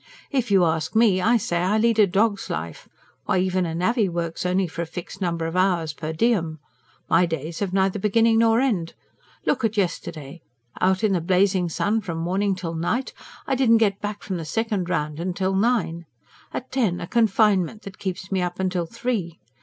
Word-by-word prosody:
If 255 -5 0
you 190 -3 +5
ask 160 +1 -1
me, 215 -5 +4
I 235 +5 +4
say 175 -5 -1
I 185 +5 +1
lead 225 0 +2
a 210 - +6
dog's 200 +2 +1
life 80 0 -5 0.4
why, - - +1
even 185 -1 +1
a 165 - -4
navvy 205 +4 +1
works 170 0 -3
only 185 +1 +1
for 170 0 -5
a 170 - -3
fixed 180 +3 -8
number 170 -2 -1
of 165 +2 -4
hours 180 -4 +1
per 155 0 -5
diem! 165 -3 +1 0.5
My 175 +1 +4
days 160 0 -4
have 200 -3 -2
neither 190 +1 +1
beginning 225 +3 +3
nor 230 0 +4
end. 205 -11 0 0.5
Look 255 - +1
at 220 -1 0
yesterday! 165 -5 -3 0.4
Out 190 +2 +2
in 210 -2 +3
the 180 - +1
blazing 185 0 +2
sun 210 +7 0
from 170 -5 -5
morning 190 +4 0
till 175 -3 -5
night 195 +11 -2 0.3
I 270 - -1
didn't 250 -3 +4
get 205 -3 +1
back 205 0 -5
from 190 -3 -3
the 165 - -5
second 210 0 -2
round 170 +1 -2
till 190 0 0
nine. 190 -6 0 0.4
At 260 - -6
ten 225 -10 0
a - - -4
confinement 210 -2 +2
that 195 -2 -10
keeps 190 0 -5
me 190 -1 +1
up 175 0 -3
till 175 -2 -2
three. 200 -5 -3
185 Hz, 195 wpm, -23 LUFS, 170-215 Hz, 0.5 s, a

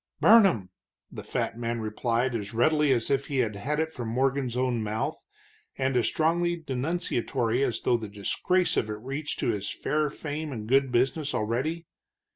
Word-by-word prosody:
"Burn 225 -3 +8
'em," 95 - -2 0.4
the - - -7
fat 115 - -3
man 115 0 -2
replied, 115 +3 -1
as 110 -1 -4
readily 150 +4 +3
as 120 -1 +1
if 140 0 +1
he 140 - -2
had 120 +5 -1
it 160 0 -1
from 120 -3 -5
Morgan's 130 +1 0
own 125 -2 0
mouth, 110 +1 -3 0.5
and 130 -1 0
as 120 - +3
strongly 175 +2 +1
denunciatory 135 -5 -1
as 115 -4 -1
though 120 - +2
the 110 -2 -6
disgrace 135 - 0
of 110 - 0
it - - -2
reached 140 +7 -4
to - - +1
his 105 -3 -2
fair 150 0 0
fame 150 +1 -5
and 110 -5 -5
good 135 +1 +3
business 130 +4 +1
already. 130 +10 -1
130 Hz, 175 wpm, -27 LUFS, 115-150 Hz, 0.5 s, Burn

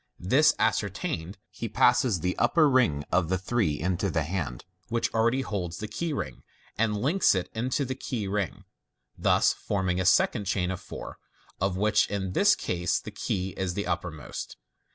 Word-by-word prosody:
This 140 - +4
ascertained, 100 - -1
he 115 +5 -5
passes 120 -4 +3
the 90 +2 0
upper 160 -3 +4
ring 115 - +2
of 85 -2 +2
the 95 - +2
three 95 -6 0
into 90 +3 0
the 80 -2 0
hand 75 -7 -4 0.2
which 115 0 -1
already 115 +4 +2
holds 90 -9 -4
the 105 - -5
key 170 +8 -3
ring, 65 - -4 0.3
and 110 -1 +1
links 150 - +3
it 95 - -2
into 130 +5 -1
the 130 - -2
key 120 -5 -4
ring, 100 -2 -2 0.5
thus - - +3
forming 95 -2 -1
a - - -2
second 100 +2 +3
chain 95 -1 0
of 95 - -5
four, - - -8 0.4
of 95 0 0
which 105 +2 +3
in 95 -2 -3
this - - +5
case 90 0 -1
the - - -9
key 95 0 -2
is 95 -2 -3
the 100 - -2
uppermost. 85 -3 -5
95 Hz, 175 wpm, -27 LUFS, 90-115 Hz, 0.5 s, this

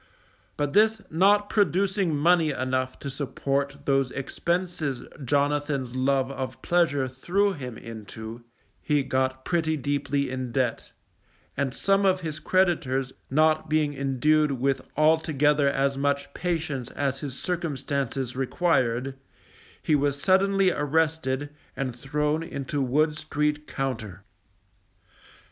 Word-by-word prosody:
But 145 -1 -1
this 220 +1 +4
not 200 +5 +4
producing 195 -3 +1
money 165 +1 +4
enough 130 -1 -1
to 140 - -4
support 140 +1 -2
those 135 -2 +2
expenses 160 0 -2 0.2
Jonathan's 145 -1 0
love 135 +1 +1
of 130 -1 -5
pleasure 155 -6 +2
threw 185 +10 0
him 125 -8 -7
into, 110 +1 -8 0.4
he 150 -2 +1
got 130 0 -1
pretty 160 -3 +1
deeply 140 0 -1
in 130 -2 -4
debt; 125 -2 -1 0.7
and 140 -1 0
some 195 +8 +2
of 190 -1 +3
his 155 -2 -4
creditors 135 -8 +1 0.2
not 155 +2 +2
being 155 -1 +2
endued 140 +2 +2
with 135 +1 0 0.2
altogether 150 -2 +3
as 135 0 0
much 140 0 -1
patience 155 -8 -2
as 135 -1 -2
his 140 -3 -6
circumstances 140 -7 -2
required, 130 -3 +1 0.7
he - - +1
was 145 -1 +1
suddenly 195 +2 +3
arrested, 145 -2 0 0.3
and 130 -3 -2
thrown 150 +4 -1
into 140 -3 -3
Wood 150 +4 +2
street 150 0 -1
Compter. 110 -8 -4
145 Hz, 120 wpm, -26 LUFS, 130-160 Hz, 0.7 s, this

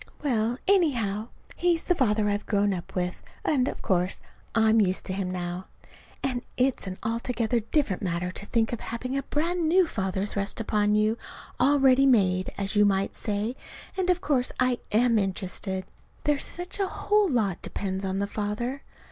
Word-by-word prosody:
Well, 240 -3 +1
anyhow, 235 - +2 0.3
he's 345 -2 +1
the 360 - +2
father 215 -9 +2
I've 205 0 -1
grown 205 -1 +2
up 175 -2 -7
with, 180 -1 -2 0.2
and 265 -4 +2
of - - -5
course 180 0 +1 0.4
I'm 220 0 +5
used 185 -2 +1
to 185 - -2
him 190 -1 -2
now. 180 0 -4 0.6
And 255 -3 -1 0.2
it's 255 -5 +1
an 185 0 -5
altogether 230 +1 0
different 225 - 0
matter 180 -1 -1
to 200 +2 -4
think 230 -1 +1
of 235 - -3
having 255 +3 -4
a 275 - +1
brand 325 +4 0
new 365 +2 +5
father 190 - -2
thrust 200 0 -1
upon 210 -1 +2
you, 215 +2 +2 0.4
all 280 +3 +4
ready 270 0 +5
made, 185 -7 +3
as 195 +1 -2
you 210 - +6
might 195 -1 +2
say, 215 +3 -1 0.4
and 370 -1 0
of 360 0 +2
course 265 -7 +1
I 255 -1 +2
am 230 +1 +4
interested. 190 -1 -3 0.4
There's 295 -1 +1
such 355 +3 -5
a 390 - +2
whole 415 +1 +2
lot 210 - 0
depends 190 -1 -3
on 190 0 -1
the 200 - +1
father. 215 +6 -3
220 Hz, 175 wpm, -27 LUFS, 195-265 Hz, 0.6 s, you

